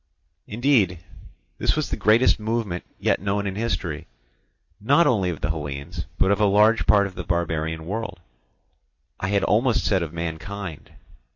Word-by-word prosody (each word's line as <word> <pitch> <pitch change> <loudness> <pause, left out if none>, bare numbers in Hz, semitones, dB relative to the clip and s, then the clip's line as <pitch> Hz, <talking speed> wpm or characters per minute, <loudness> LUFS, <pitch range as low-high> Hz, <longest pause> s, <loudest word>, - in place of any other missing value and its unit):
Indeed 110 -6 +2 0.6
this - - +2
was - - -2
the - - 0
greatest 110 +5 +4
movement 110 -5 -2
yet - - +1
known 100 +1 -1
in 95 - -2
history, 95 -7 -3 0.7
not 140 +10 +4
only 100 -7 +2
of 85 - -5
the - - 0
Hellenes, 70 -3 -5
but 95 - +3
of 100 +1 +1
a - - +5
large 105 +3 +4
part 100 -1 +5
of 100 - -6
the 90 - -6
barbarian 80 -1 -2
world—I 90 - -9
had 100 0 +1
almost 115 +2 +2
said 95 -3 +2
of 80 -2 -4
mankind. 85 +2 -6
100 Hz, 155 wpm, -24 LUFS, 85-105 Hz, 0.7 s, a